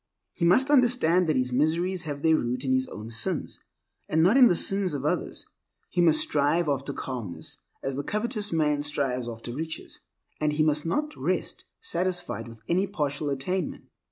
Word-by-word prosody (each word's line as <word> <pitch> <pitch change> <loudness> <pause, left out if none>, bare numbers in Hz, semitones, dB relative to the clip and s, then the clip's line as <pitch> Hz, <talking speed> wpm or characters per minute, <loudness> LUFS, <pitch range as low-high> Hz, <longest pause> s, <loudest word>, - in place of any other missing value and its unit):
He 170 - -1
must 255 +11 +4
understand 235 - +3
that 155 - +2
his 125 -1 0
miseries 165 +7 +1
have 140 -1 -5
their 160 -1 +5
root 125 -1 -2
in 130 - +2
his 130 0 +1
own 110 +2 -8
sins, 110 -1 -2 0.5
and 160 +1 +3
not 190 +7 +5
in 260 -2 +8
the 175 - +3
sins 195 -3 +2
of 140 0 -4
others. 150 - -1 0.5
He 180 - +1
must 160 -2 +5
strive 150 +3 +1
after 140 -1 -1
calmness 120 -10 -6 0.3
as 135 0 -2
the 140 - -2
covetous 210 - -1
man 150 -3 +1
strives 135 -4 -1
after 115 +1 -7
riches; 160 +4 -6 0.4
and 150 -1 +1
he 155 +1 +2
must 150 0 +1
not 300 - -1
rest - - -2 0.2
satisfied 180 - -1
with 115 -1 -12
any 185 +3 +1
partial 145 -6 -2
attainment. 155 +6 -3
155 Hz, 180 wpm, -27 LUFS, 135-180 Hz, 0.5 s, in